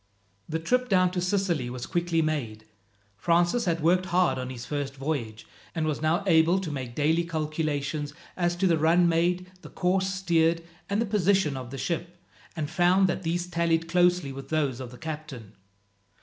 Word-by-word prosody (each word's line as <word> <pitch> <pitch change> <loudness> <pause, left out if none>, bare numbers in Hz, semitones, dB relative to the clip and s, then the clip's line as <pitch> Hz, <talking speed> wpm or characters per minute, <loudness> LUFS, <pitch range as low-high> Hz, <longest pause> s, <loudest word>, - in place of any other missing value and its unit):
The 160 - -1
trip 250 +10 0
down 185 -2 +4
to 180 -1 -2
Sicily 180 -8 0
was 125 0 -5
quickly 170 -1 0
made. 120 -9 -3 0.5
Francis 175 - +2
had 165 -3 0
worked 180 +3 +3
hard 175 -8 +2
on 125 0 -4
his 125 -2 -7
first 145 -2 -3
voyage, 135 -6 -4 0.3
and 160 -1 0
was 155 -2 -2
now 165 +5 +1
able 170 0 +4
to 170 -5 -4
make 130 -4 -5
daily 160 +3 +2
calculations 155 -2 -2 0.2
as 175 -1 0
to 185 +2 0
the 170 -3 +3
run 170 +3 +4
made, 175 +2 +1
the - - -11
course 190 +1 0
steered, 170 -3 +1 0.3
and 200 +1 0
the 230 - +1
position 195 -7 +2
of 130 -2 -6
the 135 - -7
ship, 175 +4 -3 0.4
and 155 -3 -2
found 180 +3 +3
that 185 - -2
these 175 0 -1
tallied 170 -2 0
closely 175 -3 +2
with 135 0 -9
those 145 -6 0
of 130 -2 -6
the 125 - -12
captain. 150 -8 -7
165 Hz, 180 wpm, -27 LUFS, 145-180 Hz, 0.5 s, down